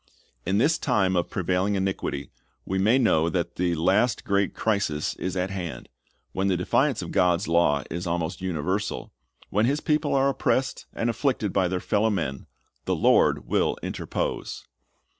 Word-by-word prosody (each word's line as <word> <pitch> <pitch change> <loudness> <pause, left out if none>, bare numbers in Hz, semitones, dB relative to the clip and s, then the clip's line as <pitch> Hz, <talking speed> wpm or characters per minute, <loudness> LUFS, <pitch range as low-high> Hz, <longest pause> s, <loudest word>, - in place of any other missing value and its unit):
In 95 +2 +2
this 150 +8 +3
time 95 -8 +1
of 85 - 0
prevailing 95 +2 0
iniquity 95 -7 -2 0.3
we 95 0 -1
may 110 +6 +4
know 85 -10 +3
that - - -2
the 90 -1 +1
la.st 105 +9 +2
great 100 -1 0
crisis 100 -9 -1
is 95 0 -3
at 90 +1 -1
hand. 90 -5 -6 0.4
When 95 +1 -1
the 95 -2 +2
defiance 90 - +1
of - - -7
God's 90 +1 +2
law 80 -4 +3
is 85 +1 -4
almost 85 +1 -2
universal, 95 +3 -2 0.4
when 105 +4 +2
His 145 +3 +1
people 150 -2 0
are 135 0 +3
oppressed 135 -1 -1
and 115 - -1
afflicted 120 -4 0
by 95 -2 +2
their 90 +1 -1
fellow 105 +4 +1
men, 80 -10 -3 0.4
the - - +1
Lord - - +3
will - - +1
interpose. - - -4
95 Hz, 160 wpm, -25 LUFS, 85-110 Hz, 0.4 s, may